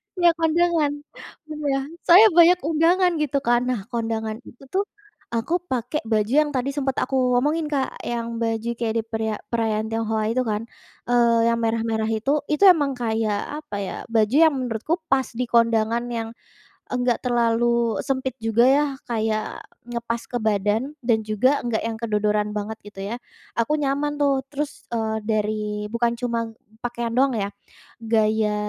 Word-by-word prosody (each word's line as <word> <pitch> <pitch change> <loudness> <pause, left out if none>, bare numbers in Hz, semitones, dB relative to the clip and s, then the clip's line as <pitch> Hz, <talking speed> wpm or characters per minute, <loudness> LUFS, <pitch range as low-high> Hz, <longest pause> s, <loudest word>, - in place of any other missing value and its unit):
Nah 350 -1 +3
iya, - - +8
kondangan 325 -2 +2 0.6
iya, 295 -3 -1 0.3
saya 375 +6 +9
banyak 350 +1 +7
undangan, 350 +3 +3
gitu 285 -2 0
kan. 240 0 +4
Nah, 250 - 0
kondangan 225 -2 -2
itu 250 - -18
tuh, 395 +2 +1 0.5
aku 230 +8 -1 0.2
pakai 255 +4 -1
baju 215 +3 +1
yang 295 -1 -1
tadi 255 +1 0
sempat 270 -2 0
aku 265 - -3 0.3
omongin 310 +3 0
Kak, 275 -2 0 0.2
yang 230 -1 -3
baju 225 0 -1
kayak 225 -2 -1
di - - -2
periya 220 -1 -1 0.2
perayaan 220 -2 0
Tionghoa 225 -1 -1
itu 245 +3 +1
kan, 210 +1 -1 0.5
eee, 235 -1 +4
yang 230 - +1
merah-merah 225 -1 0
itu, 270 +6 -1 0.2
itu 300 +6 +1
emang 290 -4 0
kayak, 220 -2 0 0.3
apa 210 - -7
ya, 195 - -4 0.2
baju 220 +2 +2
yang 315 - +4
menurutku 245 +4 -2 0.2
pas 265 -1 +3
di 250 +2 -2
kondangan, 230 0 +2
yang 225 -1 -3 0.6
enggak 245 -1 +1
terlalu 235 -2 +2
sempit 260 -2 -2
juga, 225 +1 +3
ya, 285 +3 +4 0.2
kayak, 220 -2 -2 0.3
ngepas 235 -1 -3
ke 245 - 0
badan, 215 +5 0
dan 225 -2 +3
juga 255 +7 +2
nggak 230 -2 0
yang 230 -1 -2
kedodoran 210 -1 0
banget, 215 +2 -4
gitu 205 -1 -11
ya, - - -2 0.4
aku 230 +6 +1
nyaman 290 +1 -1
tuh. 275 -2 +2
Terus, 290 0 -4
eee, 220 -1 -1
dari 215 -1 0 0.3
bukan 235 0 +1
cuma 235 -1 -1 0.4
pakaian 240 -1 -3
doang 265 +1 +3
ya, 200 -1 -1 0.5
gaya, 220 -1 +1
235 Hz, 160 wpm, -23 LUFS, 220-270 Hz, 0.6 s, saya